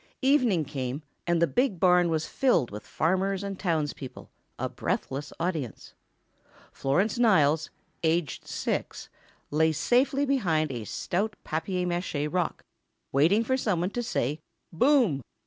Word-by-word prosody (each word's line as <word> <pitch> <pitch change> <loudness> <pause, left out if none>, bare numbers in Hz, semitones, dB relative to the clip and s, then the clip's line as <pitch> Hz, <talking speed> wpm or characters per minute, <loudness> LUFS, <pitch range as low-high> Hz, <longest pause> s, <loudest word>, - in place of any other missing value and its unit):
Evening 250 - +3
came, 135 0 -4 0.2
and 170 -1 +2
the 170 - +5
big 245 -1 0
barn 180 -1 +5
was 160 -1 0
filled 210 - +1
with 105 +1 -8
farmers 190 +4 0
and 195 -1 -5
townspeople, 150 -7 -3 0.3
a - - -1
breathless 140 +2 -3
audience. 165 - -3 0.8
Florence 190 - 0
Niles, 160 -9 +4 0.3
aged 160 -3 0
six, - - -3 0.4
lay 160 +2 +3
safely 250 - +2
behind 170 - +1
a 120 -4 -5
stout 200 - -2
papier 180 +3 -2
mâché 175 -4 -1
rock, 180 -2 -1 0.5
waiting 165 +11 +4
for 260 +3 +1
somebody 190 -6 0
to 245 - -1
say 150 - -1 0.3
"Boom!" 235 - +3
170 Hz, 130 wpm, -27 LUFS, 150-205 Hz, 0.8 s, the